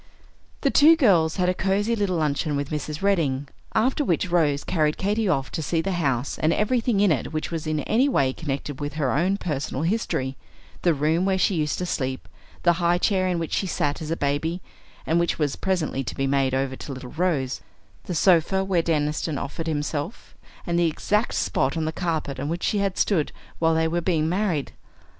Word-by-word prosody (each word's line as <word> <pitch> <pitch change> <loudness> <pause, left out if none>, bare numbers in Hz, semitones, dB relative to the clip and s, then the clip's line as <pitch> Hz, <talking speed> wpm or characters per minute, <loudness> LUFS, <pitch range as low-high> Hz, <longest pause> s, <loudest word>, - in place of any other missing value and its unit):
The 275 - +2
two 310 +3 +7
girls 180 - +3
had 180 -2 +1
a 180 - +3
cosey 200 +5 0
little 200 -5 0
luncheon 150 0 0
with 140 0 -3
Mrs. 150 +2 -4
Redding, 145 -9 +1 0.3
after 260 +6 +2
which 180 - 0
Rose 150 -5 +2
carried 155 -3 +1
Katy 210 +1 0
off 135 -5 0
to - - -3
see 165 +3 0
the 195 +4 -1
house 140 -7 -1
and 155 - +2
everything 230 +1 +1
in 205 -4 +4
it 145 -2 -1
which 155 +1 -3
was 165 -2 -4
in 155 -1 0
any 240 - +2
way 135 - +2
connected 140 -2 -4
with 145 0 -4
her 145 -4 0
own 185 +7 +1
personal 150 -5 -3
history, 165 - -1 0.5
the 170 -3 +3
room 155 +5 +1
where 190 0 +2
she 190 - +2
used 155 -3 0
to 180 - -2
sleep, 130 -6 -3 0.4
the 175 - +5
high 175 +1 +3
chair 185 0 +1
in 180 -1 0
which 165 -1 -3
she 195 - 0
sat 145 -4 -1
as 155 - -5
a 165 - -1
baby 145 +5 -1 0.5
and 165 +1 +2
which 170 - 0
was 145 -3 0
presently 170 -8 -1
to - - -5
be 135 - -1
made 135 -1 +1
over 135 0 -1
to 140 - -8
little 130 -1 -8
Rose, 155 -7 -1 0.4
the 180 - -3
sofa 185 +3 +3
where 190 -3 +1
Deniston 150 -1 -1
offered 160 +5 -5
himself, 150 +4 -3 0.3
and 170 -1 0
the 170 - +4
exact 210 +7 0
spot 135 +5 0
on 160 - -1
the 160 - -1
carpet 160 -6 -2
on 140 +2 -3
which 170 +1 -3
she 210 - +1
had 195 -2 -1
stood 170 -8 +1 0.3
while 165 0 +3
they 160 0 +2
were 170 +2 -1
being 165 -3 +1
married! 180 -5 0
165 Hz, 205 wpm, -24 LUFS, 145-185 Hz, 0.5 s, two